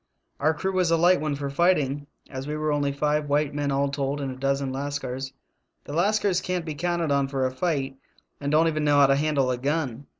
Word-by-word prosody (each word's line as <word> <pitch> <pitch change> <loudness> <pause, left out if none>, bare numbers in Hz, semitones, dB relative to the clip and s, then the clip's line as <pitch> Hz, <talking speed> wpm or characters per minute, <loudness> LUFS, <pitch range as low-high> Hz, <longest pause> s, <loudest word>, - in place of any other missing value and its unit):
Our 155 +1 +2
crew 190 +5 -2
was 185 -2 +1
a 165 - +4
light 175 0 +4
one 155 -2 -1
for 140 0 -4
fighting, 145 -3 +1 0.2
as 130 0 -6
we 150 +1 -3
were 155 0 0
only 145 -1 +1
five 150 +1 0
white 145 0 +1
men 145 -1 -1
all 140 +1 +1
told 140 0 -2
and 135 -2 -3
a - - -7
dozen 135 0 -1
LavScars. 135 -1 -4 0.5
The 145 - -8
Lascars 195 +2 +2
can't 180 -2 -2
be 155 - -4
counted 170 0 -1
on 140 -1 +2
for 135 -1 -1
a 130 - 0
fight 135 -2 -2 0.4
and 145 0 -2
don't 160 +2 +4
even 155 -1 0
know 145 -1 +3
how 140 - +8
to 135 0 +4
handle 140 -3 +1
a 125 - -2
gun. 140 -2 -2
145 Hz, 230 wpm, -25 LUFS, 140-155 Hz, 0.5 s, how